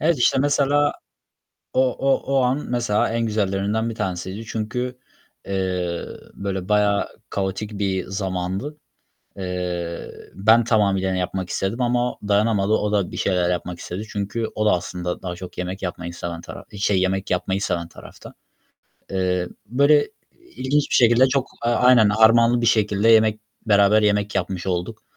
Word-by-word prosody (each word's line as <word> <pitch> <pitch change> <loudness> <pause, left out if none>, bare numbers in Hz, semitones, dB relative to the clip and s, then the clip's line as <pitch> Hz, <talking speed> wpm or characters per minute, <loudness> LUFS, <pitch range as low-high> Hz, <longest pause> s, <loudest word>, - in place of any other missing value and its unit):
Evet, 160 -2 +2
işte, 120 - +3
mesela 145 +1 +2 0.8
o - - +2 0.2
o 135 0 +1
o - - +4
an, 130 +4 0
mesela, 120 -4 +1
en 115 0 -1
güzellerinden 105 +2 -1
bir - - -5
tanesiydi. 95 0 -4
Çünkü, 125 +3 -4 0.5
eee, 90 -3 -2 0.3
böyle 95 -1 -4
bayağı 105 -1 +2 0.2
kaotik 100 +2 -3
bir 95 -2 -1
zamandı. 95 +8 -3 0.6
Eee, 90 -2 -4 0.2
ben 110 +4 +4
tamamıyla, 100 -4 +2
hani, 95 - -1
yapmak 90 0 -3
istedim 100 +6 -2
ama 125 0 0
dayanamadı 105 0 +2
o 105 -1 +1
da 100 -3 +1
bir - - -7
şeyler 90 -2 +1
yapmak 90 0 -3
istedi. 95 +6 -6
Çünkü 105 +3 -2
o 110 - 0
da 105 - +5
aslında 90 0 -3
daha 90 -1 -4
çok 90 0 -10
yemek 90 +2 -4
yapmayı 90 -1 -5
seven 85 -1 -5
taraf - - -10
şey, 100 -1 +2
yemek 95 +1 -1
yapmayı 95 +2 0
seven 85 -4 -2
tarafta. - - -13 0.8
Eee, 90 -2 0 0.2
böyle 140 +6 +3 0.5
ilginç 140 +3 0
bir - - +1
şekilde 120 +1 +5
çok 135 -1 0
A 120 0 +1
aynen, 125 -4 +5
harmanlı 115 +3 +5
bir 115 - +1
şekilde 105 -1 +2
yemek 110 -1 +5 0.3
beraber 105 0 +5
yemek 105 0 +1
yapmış 95 -1 -2
olduk. 90 -1 -3
100 Hz, 155 wpm, -22 LUFS, 95-115 Hz, 0.8 s, da